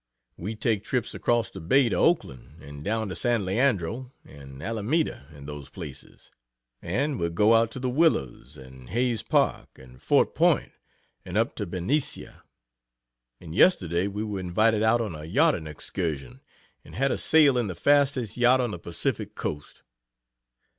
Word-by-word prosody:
We 105 +6 -5
take 110 -1 -1
trips 120 +1 -2
across 120 -1 0
the 95 - -9
Bay 130 +11 +3
to - - -1
Oakland, 70 - 0
and 70 +1 -10
down 110 +4 -1
to 90 - -5
San 120 -5 0
Leandro, 115 +2 0
and 70 -1 -13
Alameda, 115 - -1
and 70 -2 -12
those 75 -2 -8
places; 75 -6 -10 0.5
and 135 - -1
we 85 - 0
go 105 +7 +3
out 115 0 +4
to 125 - -8
the 130 - -2
Willows, 125 - 0
and 65 -1 -13
Hayes 120 +1 0
Park, - - 0
and 65 -1 -16
Fort - - +2
Point, - - +2 0.5
and 90 +2 -4
up 115 +5 +1
to 105 - -3
Benicia; 95 - -2 1.0
and 80 -2 -10
yesterday 90 - +3
we 105 +2 -4
were 105 -3 -4
invited 105 +5 +1
out 110 +2 +3
on 105 -6 -3
a 75 -1 -8
yachting 110 - +2
excursion, 75 -5 -4 0.4
and - - -13
had 135 +3 +1
a - - -1
sail 150 -4 +5
in 120 -3 0
the 90 - -5
fastest 135 -1 +2
yacht 125 +1 +5
on 120 -3 -1
the 90 - -6
Pacific 85 -1 -3
Coast. 75 0 -6
105 Hz, 165 wpm, -26 LUFS, 80-125 Hz, 1.0 s, sail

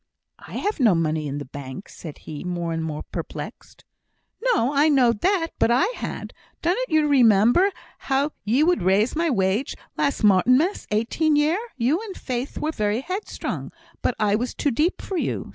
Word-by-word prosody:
"I - - -13
have 415 -3 -2
no 225 -8 +5
money 155 -2 0
in 140 0 -4
the 145 - -5
bank!" 135 +6 -8
said 155 -4 -10
he, 150 -2 -8
more 175 -2 -3
and 165 0 -2
more 155 -2 -4
perplexed. - - -7 0.6
"No! 415 - +2
I 290 +2 +4
knowed 245 -7 +3
that; 365 -4 +2
but - - +3
I 245 +9 +4
had. - - -6 0.3
Dunnot 380 +10 0
ye 315 -2 +4
remember 250 - +5 0.3
how 275 +2 0
you 245 +9 +3
would 355 +1 +2
raise 195 - +2
my 335 +1 +1
wage, 200 +2 0 0.2
last 280 -4 0
Martinmas 255 - +3
eighteen 240 +9 +1
year? 305 +6 +2 0.2
You 265 - +1
and 420 -4 -8
Faith 255 +1 -4
were 310 - -1
very 215 -3 -1
headstrong, 370 +8 -5 0.3
but 250 - 0
I 210 -1 +2
was 240 +4 -1
too 285 - 0
deep 305 +9 0
for 385 - -3
you. - - -2
250 Hz, 180 wpm, -23 LUFS, 200-315 Hz, 0.6 s, no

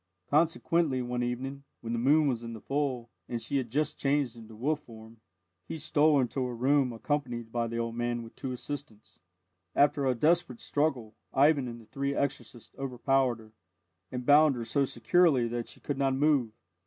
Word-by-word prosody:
Consequently, 155 -3 +2
one 125 0 -2
evening, 130 +3 -3 0.2
when 115 0 -4
the 115 - 0
moon 145 +5 +4
was 120 -4 0
in 115 -1 -6
the 110 - -8
full, 135 -4 -2 0.2
and 120 - -2
she 115 +5 -2
had 130 -3 -2
just 150 +6 -1
changed 140 -3 +1
into 115 -1 -12
wolf 145 +7 0
form, 115 -4 -14 0.5
he - - -5
stole 150 -1 +3
into 130 +1 0
her 125 -1 -3
room 130 +2 +2
accompanied 120 -2 -3
by 120 0 -1
the 115 0 -4
old 115 0 -2
man 120 0 -1
and 115 -1 -11
two 130 - -5
assistants. 125 -3 -8 0.6
After 140 -1 +3
a 130 - +2
desperate 155 -1 +2
struggle, 135 -7 -1 0.2
Ivan 140 -1 +4
and 120 -1 -7
the 115 - -15
three 140 +5 -2
exorcists 135 -4 -4
overpowered 135 -1 +1
her, 110 -1 -16 0.6
and 125 -1 -4
bound 145 0 +6
her 120 -1 -4
so 140 +5 +1
securely 130 +2 +3
that 120 0 -3
she - - -12
could 140 -2 -4
not 135 -1 +2
move. 140 -4 +3
130 Hz, 185 wpm, -29 LUFS, 120-145 Hz, 0.6 s, bound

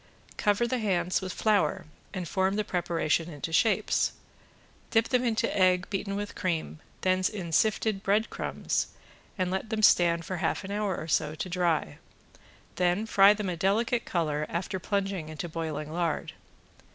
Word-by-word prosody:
Cover 205 +2 +2
the 255 +1 -1
hands 185 -4 0
with 185 -1 -4
flour 205 -9 +1 0.3
and 180 -3 -4
form 190 +2 +1
the 215 - 0
preparation 170 -3 0
into 150 +2 -6
shapes, 220 +6 +2 0.8
dip 225 -1 +2
them 250 -1 +2
into 230 -3 0
egg 185 -2 +3
beaten 200 0 -2
with 205 0 -4
cream, 165 -4 -2 0.2
then 185 0 +2
in 185 -6 -5
sifted 215 +3 +2
breadcrumbs 210 +3 0 0.5
and 185 -1 0
let 190 +4 -2
them 215 -1 -2
stand 170 -4 +5
for 185 - -3
half 175 - -1
an 190 - -6
hour 205 -3 -1
or 155 - -6
so 150 -1 +1
to 155 - -4
dry; 170 - 0 0.8
then 180 +4 +2
fry 205 -2 +6
them 210 -2 -3
a 175 - -2
delicate 225 +7 +1
color 155 -3 -1
after 190 +2 -3
plunging 195 -4 -2
into 155 +2 -5
boiling 155 -2 -4
lard. 170 -2 -1
185 Hz, 160 wpm, -28 LUFS, 170-205 Hz, 0.8 s, fry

